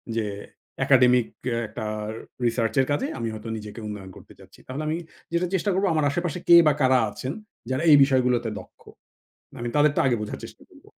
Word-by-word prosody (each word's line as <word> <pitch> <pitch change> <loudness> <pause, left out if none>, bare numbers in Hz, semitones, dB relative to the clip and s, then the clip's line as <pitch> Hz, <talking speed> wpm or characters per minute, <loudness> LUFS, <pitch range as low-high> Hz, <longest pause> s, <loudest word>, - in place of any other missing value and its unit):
যে 115 -1 0 0.6
একাডেমিক 125 -2 +5 0.2
কে 125 - 0
একটা 110 +1 -6 0.6
রিসার্চ 115 -2 0
এর 130 - +4
কাজে 145 - 0
আমি 115 - -2
হয়তো 110 +1 -7
নিজেকে 105 +1 -9
উন্নয়ন 100 -3 -7
করতে - - -15
চাচ্ছি। - - -17
তাহলে 135 +4 -5
আমি 155 +1 -1 0.4
যেটা 170 +1 +1
চেষ্টা 190 +2 +1
করব 195 +2 +1
আমার 155 -2 +1
আশেপাশে 175 +2 -2
কে 170 - +8
বা 150 - +5
কারা 130 -1 +4
আছেন 130 +6 -5 0.4
যারা 130 +4 -1
এই 145 - +9
বিষয়গুলোতে 125 -3 +1
দক্ষ। 95 - -16 0.7
মানে 120 - -5
তাদের 150 0 +4
টা - - +3
আগে 125 - +2
বোঝার 105 - -5
চেষ্টা - - -14
করব। - - -20
130 Hz, 190 wpm, -24 LUFS, 115-150 Hz, 0.7 s, এই